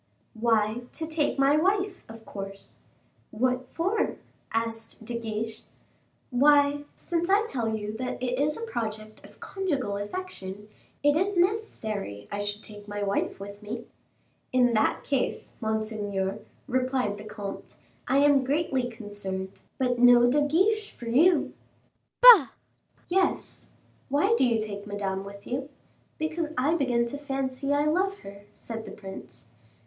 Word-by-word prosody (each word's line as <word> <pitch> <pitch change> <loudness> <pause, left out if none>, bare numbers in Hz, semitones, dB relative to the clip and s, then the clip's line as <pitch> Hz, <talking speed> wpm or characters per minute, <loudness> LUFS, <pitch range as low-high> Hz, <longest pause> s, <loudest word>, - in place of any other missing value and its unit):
"Why, 225 0 +1
to 320 - -3
take 310 -2 0
my 275 +1 +4
wife, 380 +3 +1
of 225 0 -11
course." 195 0 -8 0.5
"What 250 +3 0
for?" 380 - -1 0.3
asked 225 0 -3
De 240 - -4
Guiche. 220 0 -4 0.7
"Why, 285 +2 +4
since 345 0 -2
I 405 +3 +4
tell 230 - -1
you 210 0 -4
that 250 +1 -3
it 250 0 -1
is 300 +1 +1
a 460 - -4
project 215 - -5
of - - -16
conjugal 285 - -2
affection, 205 - -6 0.3
it 290 0 +5
is 380 +4 +1
necessary 220 - -1
I 205 - -3
should 205 +1 -3
take 205 -1 -11
my 205 0 -3
wife 200 -1 -1
with 200 +1 -9
me." 230 +3 -6 0.7
"In 250 -2 +4
that 215 - +2
case, 275 -3 -2
monseigneur," 215 -3 -2 0.3
replied 255 -5 0
the - - -8
comte, 210 -2 -7 0.3
"I 270 - +3
am 285 -2 +5
greatly 270 -3 0
concerned, 205 -4 -6 0.2
but 250 -2 +1
no 245 0 +7
De 285 +4 +3
Guiche 390 +9 +2
for 240 - -10
you." 315 +10 +4 0.7
"Bah!" 455 - +11 0.6
"Yes. 375 +1 0 0.4
Why 295 +11 +3
do 260 - +4
you 230 -2 +2
take 205 -1 -5
Madame 195 -2 -2
with 200 0 -10
you?" 265 +3 -3 0.5
"Because 315 +1 -1
I 275 +5 +3
begin 250 -7 +2
to 280 +4 -5
fancy 270 -1 -2
I 290 +1 +3
love 380 +6 +1
her," 200 +1 -11
said 225 -1 -7
the 200 - -8
prince. 135 - -9
245 Hz, 145 wpm, -27 LUFS, 210-290 Hz, 0.7 s, Bah